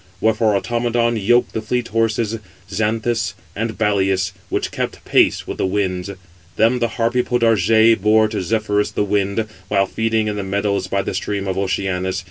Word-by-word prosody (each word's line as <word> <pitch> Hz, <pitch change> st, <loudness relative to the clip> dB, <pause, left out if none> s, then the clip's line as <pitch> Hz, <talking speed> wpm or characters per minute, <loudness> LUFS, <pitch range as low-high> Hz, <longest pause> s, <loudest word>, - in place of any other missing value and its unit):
Wherefore 110 Hz, -1 st, +2 dB
Automedon 120 Hz, +1 st, 0 dB
yoked 120 Hz, +4 st, +2 dB
the 110 Hz, -, -2 dB
fleet 120 Hz, +2 st, -2 dB
horses, 115 Hz, 0 st, 0 dB, 0.3 s
Xanthus 110 Hz, +1 st, -1 dB, 0.2 s
and 110 Hz, +1 st, -3 dB
Balius, 95 Hz, -3 st, +1 dB, 0.2 s
which -, -, -2 dB
kept -, -, -4 dB
pace -, -, +3 dB
with -, -, -6 dB
the -, -, +1 dB
winds. 95 Hz, -1 st, -1 dB, 0.5 s
Them 115 Hz, +3 st, +3 dB
the 120 Hz, -, +1 dB
Harpy 120 Hz, +2 st, +2 dB
Podargé 115 Hz, -2 st, +3 dB
bore 110 Hz, +1 st, +4 dB
to 110 Hz, -, -3 dB
Zephyrus, 105 Hz, +2 st, 0 dB
the -, -, -1 dB
wind, 100 Hz, +1 st, 0 dB, 0.2 s
while 100 Hz, -1 st, +2 dB
feeding 110 Hz, +1 st, 0 dB
in 105 Hz, -1 st, -2 dB
the 100 Hz, -, -2 dB
meadows 100 Hz, -1 st, -1 dB
by 100 Hz, +1 st, -1 dB
the -, -, -3 dB
stream 100 Hz, -1 st, -3 dB
of 95 Hz, -, -1 dB
Oceanus. 95 Hz, -1 st, -1 dB
110 Hz, 165 wpm, -19 LUFS, 100-115 Hz, 0.5 s, bore